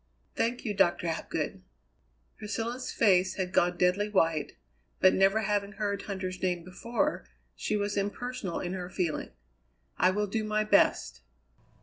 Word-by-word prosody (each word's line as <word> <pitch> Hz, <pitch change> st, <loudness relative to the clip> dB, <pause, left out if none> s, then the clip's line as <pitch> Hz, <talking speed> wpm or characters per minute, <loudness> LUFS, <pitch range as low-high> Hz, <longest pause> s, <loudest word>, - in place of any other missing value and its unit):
"Thank 240 Hz, +2 st, -1 dB
you, 210 Hz, -, -1 dB
Doctor 185 Hz, -3 st, +2 dB
Hapgood." 160 Hz, -, -3 dB, 0.7 s
Priscilla's 230 Hz, +4 st, -4 dB
face 190 Hz, -4 st, +3 dB
had 185 Hz, -2 st, -3 dB
gone 175 Hz, 0 st, +3 dB
deadly 185 Hz, +4 st, +2 dB
white, 165 Hz, -6 st, +1 dB, 0.5 s
but 185 Hz, -, +6 dB
never 195 Hz, +3 st, +4 dB
having 205 Hz, -1 st, -1 dB
heard 200 Hz, -1 st, -2 dB
Huntter's 185 Hz, -2 st, -5 dB
name 180 Hz, -2 st, 0 dB
before, 185 Hz, -, -2 dB, 0.3 s
she 210 Hz, -, -1 dB
was 205 Hz, 0 st, -1 dB
impersonal 205 Hz, -1 st, -3 dB
in 180 Hz, 0 st, -3 dB
her 180 Hz, -1 st, -5 dB
feeling. 170 Hz, -5 st, -2 dB, 0.7 s
"I -, -, +5 dB
will 210 Hz, +2 st, 0 dB
do 215 Hz, +2 st, -2 dB
my 215 Hz, 0 st, 0 dB
best." 200 Hz, -, +2 dB
195 Hz, 140 wpm, -29 LUFS, 180-210 Hz, 0.7 s, but